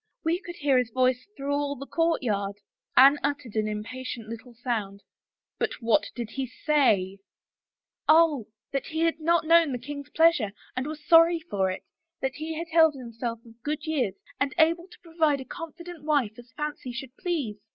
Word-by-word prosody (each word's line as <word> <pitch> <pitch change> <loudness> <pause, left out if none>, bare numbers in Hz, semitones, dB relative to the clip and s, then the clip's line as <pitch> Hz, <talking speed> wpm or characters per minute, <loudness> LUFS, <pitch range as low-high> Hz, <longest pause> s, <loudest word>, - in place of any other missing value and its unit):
Wc 335 +2 +2
could 345 - -7
hear 280 -4 +3
his 250 -2 -1
voice 255 - +1
through 280 +1 -2
all 285 0 -1
the 275 - -8
courtyard." 230 -13 0 0.4
Anne 275 +3 +8
uttered 285 -5 -2
an 215 -1 +1
impatient 225 +2 -5
little 230 +2 -9
sound. 215 -5 -3 0.3
" - - -63
But - - 0
what 230 -2 +2
did 235 -2 -5
he 270 -1 -3
say? 225 -9 +2 0.3
" - - -67
" - - -63
Oh, 310 -7 +5 0.2
that 275 - -2
he 320 +1 -3
had 330 -1 +1
not 335 +1 +2
known 330 -2 +5
the 250 - -1
king's 285 +2 -7
pleasure 320 -11 +3 0.2
and 255 +2 -2
was 305 0 -7
sorry 330 +1 +6
for 200 -11 -1
it, 185 - -5 0.4
that 265 0 -1
he 315 +4 -5
had 335 +1 -5
held 320 -2 +5
himself 235 -2 -5
of 230 0 -17
good 300 +3 -3
years 270 -11 0 0.2
and 275 0 0
able 335 +2 +3
to - - -16
provide 320 -4 +1
a 265 - -7
convenient 335 +2 -9
wife 285 -8 +1
as 240 -1 -14
fancy 300 -4 -4
should 255 +2 -7
please. 325 - -2
275 Hz, 190 wpm, -27 LUFS, 235-320 Hz, 0.4 s, Anne